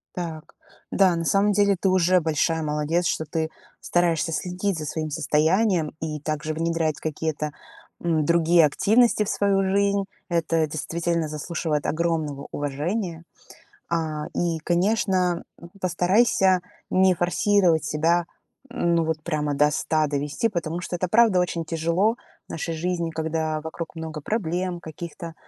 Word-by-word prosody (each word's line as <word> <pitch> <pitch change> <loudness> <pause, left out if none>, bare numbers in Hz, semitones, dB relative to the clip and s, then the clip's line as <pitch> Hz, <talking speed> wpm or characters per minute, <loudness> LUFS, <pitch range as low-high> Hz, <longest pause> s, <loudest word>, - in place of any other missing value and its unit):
Так. 165 -3 -6 0.4
Да, 190 -3 +4
на 165 - -2
самом 200 +4 +3
деле 200 0 +3
ты 190 - +2
уже 185 0 +4
большая 160 0 0
молодец, 150 +3 0
что 160 - -1
ты 160 +1 -2 0.3
стараешься 170 -2 +1
следить 180 +3 -2
за 155 - -4
своим 155 +1 -3
состоянием 160 +3 +1
и 155 -1 -3
также 155 +1 -3
внедрять 165 -1 -1
какие-то, 155 -1 -3 0.5
м, 160 -3 +1
другие 170 0 +5
активности 215 - +3
в 205 - -4
свою 195 -1 +2
жизнь. 200 +1 +2 0.3
Это 165 -2 +1
действительно 165 +2 -2
заслуживает 150 -1 -2
огромного 155 -3 -1
уважения. 165 +5 -3 0.7
А, 160 -3 -2
и, 170 -2 0
конечно, 180 +1 +1 0.2
м, 170 - -12
постарайся 185 +1 +3 0.3
не 190 0 +4
форсировать 175 -1 +2
себя, 165 +3 +1 0.4
ну, 170 -1 +1
вот 160 -1 -2
прямо 150 -3 -1
до 150 +1 +4
100 155 0 +1
довести, 145 - -1
потому 170 -3 -3
что 180 - -4
это 185 - -1
правда 215 -1 +4
очень 175 -2 -1
тяжело 170 +7 +1 0.3
в - - -43
нашей 165 +1 -3
жизни, 170 0 -1
когда 160 -1 -2
вокруг 160 +1 -7
много 160 -1 -6
проблем, 180 -1 -2
каких-то 165 +1 -8
165 Hz, 140 wpm, -24 LUFS, 155-180 Hz, 0.7 s, другие